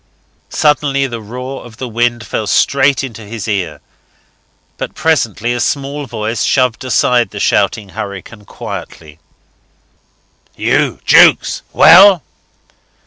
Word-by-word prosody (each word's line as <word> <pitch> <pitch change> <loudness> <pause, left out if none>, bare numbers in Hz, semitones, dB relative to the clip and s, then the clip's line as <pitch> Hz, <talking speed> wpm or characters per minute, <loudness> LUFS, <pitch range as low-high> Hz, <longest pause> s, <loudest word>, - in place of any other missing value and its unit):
Suddenly 145 -2 +1
the 120 -3 -6
roar 125 +5 -7
of 115 -2 -14
the 130 - -5
wind 120 0 -1
fell 105 0 -4
straight 140 +6 +2
into 115 -4 -8
his 110 +1 -7
ear, 90 -8 -3 1.0
but - - -6
presently 120 -7 0
a 120 - -3
small 140 +1 -3
voice 115 0 -3
shoved 125 -4 0
aside 125 -3 +1
the 105 - -8
shouting 100 +1 0
hurricane 100 +3 -8
quietly. 75 -4 -9 1.4
"You, - - 0
Jukes? - - +4
Well?" 195 -6 +7
120 Hz, 115 wpm, -14 LUFS, 105-135 Hz, 1.4 s, Well